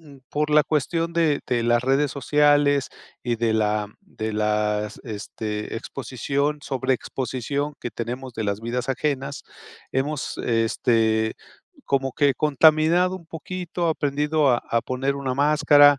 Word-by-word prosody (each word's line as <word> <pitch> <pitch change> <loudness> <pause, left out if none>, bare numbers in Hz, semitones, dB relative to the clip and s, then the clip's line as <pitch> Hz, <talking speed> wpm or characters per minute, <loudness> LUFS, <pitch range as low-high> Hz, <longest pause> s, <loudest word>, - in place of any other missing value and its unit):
mm, 145 -4 -15
por 150 +1 -1
la 150 0 +5
cuestión 165 +3 0
de 160 -4 +2
de 120 -2 0
las 120 0 +2
redes 135 +2 +2
sociales 145 -1 +3 0.3
y 120 -1 -1
de 115 -1 +1
la 105 -1 +1
de 110 0 -5
las, 105 0 0
este, 105 -1 -5
exposición 140 +5 -2
sobreexposición 135 +2 -2
que 120 - -4
tenemos 125 +3 -5
de 110 - -3
las 100 +1 -1
vidas 120 +2 -3
ajenas, 140 +1 -2 0.5
hemos, 140 +2 -2
este, 110 -1 +1 0.5
como 135 -1 0
que 145 -3 +2
contaminado 155 +5 +4
un 170 -3 -14
poquito, 170 +2 -4
aprendido 150 -1 +1
a 120 - +1
a 115 - +2
poner 135 +2 -1
una 135 -2 -2
máscara, 145 0 +6
135 Hz, 135 wpm, -24 LUFS, 115-150 Hz, 0.5 s, máscara